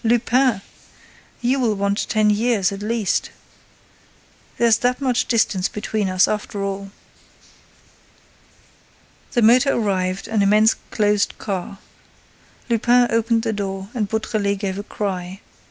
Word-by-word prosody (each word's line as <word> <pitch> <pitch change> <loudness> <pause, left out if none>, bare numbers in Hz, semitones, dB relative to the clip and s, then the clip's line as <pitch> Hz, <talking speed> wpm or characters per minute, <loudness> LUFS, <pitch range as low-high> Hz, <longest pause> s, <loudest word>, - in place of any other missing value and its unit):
Lupin! 240 -1 +2 0.8
You 255 +3 +1
will 230 -4 +1
want 200 +1 -1
ten 215 -2 +3
years, 210 -2 +1
at 200 0 -7
least! 215 -1 -1 1.3
There's 230 -2 +3
that 250 +1 0
much 255 -3 0
distance 210 -5 +1
between 210 -1 -2
us, 185 0 +3
after 210 -1 -3
all!" 195 0 -4 2.4
The 240 -3 +2
motor 250 +5 +5
arrived, 190 -2 -1
an 220 -2 0
immense 210 +2 +4 0.2
closed 210 0 +1
car. 195 -1 -5 0.9
Lupin 240 +1 +3
opened 230 0 +1
the 225 -2 -1
door 195 -1 -4
and 215 -5 -2
Beautrelet 215 -2 -1
gave 195 -1 -3
a - - -5
cry. 190 -3 -4
215 Hz, 120 wpm, -21 LUFS, 200-235 Hz, 2.4 s, motor